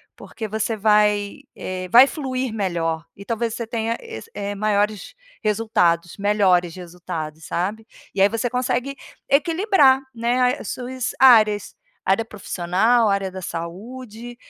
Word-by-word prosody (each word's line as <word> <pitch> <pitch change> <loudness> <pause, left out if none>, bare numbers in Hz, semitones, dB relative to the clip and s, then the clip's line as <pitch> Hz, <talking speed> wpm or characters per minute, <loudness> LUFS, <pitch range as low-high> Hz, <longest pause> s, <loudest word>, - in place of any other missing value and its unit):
Porque 220 - -7
você 220 +2 -2
vai, 210 +1 +2 0.2
eh, 185 0 -5
vai 245 +7 +9
fluir 260 -5 -3
melhor 170 -6 -2
e 200 - -11
talvez 230 0 -2
você 235 - -4
tenha 230 0 -2
es 455 0 -9
eh, 205 0 -4
maiores 210 0 -1 0.3
resultados, 180 -6 +1
melhores 195 -4 +2
resultados, 170 -3 -7
sabe? 210 +6 -3 0.3
E 195 - +1
aí 200 - +6
você 230 +2 -1
consegue 250 +2 -1 0.3
equilibrar, 305 -2 +4 0.2
né, 250 +3 +1
as - - -7
suas 255 0 -4
áreas. 215 -6 +5 0.3
Área 195 +4 +1
profissional, 210 +3 +1
área 195 -1 0
da 190 - -7
saúde, 225 +8 -7
215 Hz, 130 wpm, -22 LUFS, 190-245 Hz, 0.3 s, vai